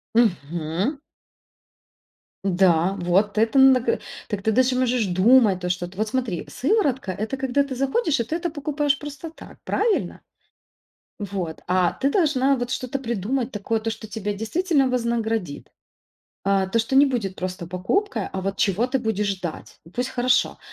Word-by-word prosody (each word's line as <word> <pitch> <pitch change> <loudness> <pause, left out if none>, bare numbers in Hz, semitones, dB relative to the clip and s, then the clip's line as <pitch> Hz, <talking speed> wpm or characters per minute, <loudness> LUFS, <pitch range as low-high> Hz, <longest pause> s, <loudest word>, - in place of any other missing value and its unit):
Мгм. 175 - 0 1.5
Н-да. 180 -1 +3
Вот 195 +4 +1
это 225 +5 +2
на 265 -1 +7
га 455 - 0 0.3
так 205 -2 -4
ты 220 - +2
даже 255 +3 +3
можешь 250 -3 +1
думать 195 +2 +4
то, 180 - -2
что 175 0 -2
ты 185 +2 -15
вот 215 - 0
смотри, 235 -7 -2
сыворотка- 275 - 0
это 215 +8 -3
когда 265 0 +1
ты 275 -2 -6
заходишь 275 - +1
и 235 - +2
ты 310 +8 -3
это 345 0 -2
покупаешь 290 -1 0
просто 295 +2 -8
так. 330 - -14
Правильно? 435 0 0 1.0
Вот. 190 -5 -4
А 180 -1 +2
ты 275 +1 0
должна 280 -7 +3
вот 245 0 -3
что-то 260 +1 -3
придумать 235 +1 -2
такое, 220 +2 -1
то, 225 +1 -3
что 220 0 -6
тебя 210 -2 -3
действительно 275 - +1
вознаградит, 225 - -2 0.7
а, 195 -1 +2
то, 230 - +1
что 230 +4 -1
не 285 - +7
будет 225 -8 -2
просто 185 -1 -5
покупкой, 200 - -1
а 190 - -3
вот 195 +1 -3
чего 205 +5 +1
ты 265 +1 0
будешь 220 -3 -1
ждать. 185 -5 -5
Пусть, 250 +1 -2
хорошо, 250 +1 +1
230 Hz, 160 wpm, -23 LUFS, 195-265 Hz, 1.5 s, на